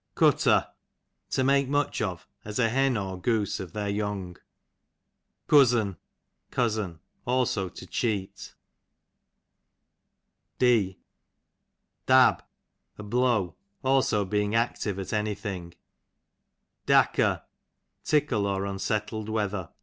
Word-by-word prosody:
Cutter, - - +4 0.6
to 130 - 0
make 140 0 +3
much 145 -3 0
of, 90 -6 -3 0.2
as 105 0 -6
a 115 -2 +3
hen 135 0 +2
or 95 -2 -4
goose 105 -2 0
of 90 -4 -7
their 105 -1 -3
young. 100 -3 -3 1.1
Cuzz'n, 120 -9 +4 0.5
cousin; 110 -8 -1 0.3
also 120 -7 0
to - - -11
cheat. 100 -5 -3 2.0
D 110 -7 +2 1.1
Dab, - - +5 0.5
a 105 - -8
blow; 110 -5 +1 0.3
aho 130 -6 +2
being 105 +2 0
active 115 -4 -1
at 95 +1 -5
any 105 -1 0
thing. 90 -5 -6 1.1
Dacker, - - +3 0.6
tickle, 135 -9 +1
or 100 0 -1
unsettled 105 +2 -3
wea 110 -1 0
ther. 95 -5 -5
105 Hz, 105 wpm, -27 LUFS, 95-120 Hz, 2.0 s, Dab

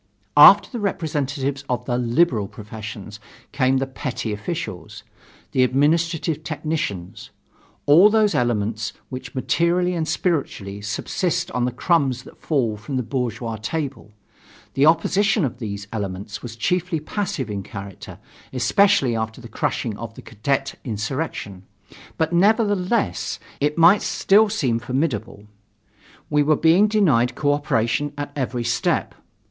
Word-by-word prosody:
After 195 +7 +9
the 240 - -6
representatives 145 -7 -2
of 125 -1 -1
the 125 - -1
"liberal" 120 -2 +2
professions 110 0 -9 0.3
came 135 -2 +2
the 135 - 0
petty 125 -4 -4
officials, 105 - -6 0.5
the 130 - +2
administrative 155 +4 +1
technicians 150 - -4 0.6
all 165 +8 +7
those 215 -1 +3
elements 110 -3 -1 0.2
which 130 +1 -8
materially 175 +6 +1
and 165 -2 -2
spiritually 110 - -2
subsist 105 - -2
on 125 -1 0
the 125 - -1
crumbs 130 -2 +1
that - - -16
fall 120 -9 0
from 130 +6 -5
the 125 - 0
bourgeois 120 -2 -3
table. 140 0 -4 0.6
The 135 +3 +4
opposition 195 +4 +3
of 120 -2 -5
these 100 -3 -5
elements 100 -1 -5
was 115 -2 -8
chiefly 180 - 0
passive 180 - -3
in 100 -1 -3
character, 100 0 -9 0.3
especially 130 - +3
after 110 +1 -3
the 120 - -10
crushing 125 -4 -2
of 115 0 -7
the - - -11
cadet 135 +5 -2
insurrection; 110 - -4 0.6
but, 160 +1 0
nevertheless, 205 +2 +1 0.2
it 150 +2 0
might 170 +5 +6
still 200 +4 +3
seem 130 - 0
formidable. 120 -4 -3 0.8
We 150 0 +2
were 150 +1 +3
being 165 +7 +4
denied 155 - +2
co 145 -1 +2
operation 145 0 0
at 145 0 -4
every 125 -3 -2
step. 120 0 0
135 Hz, 130 wpm, -22 LUFS, 115-165 Hz, 0.8 s, After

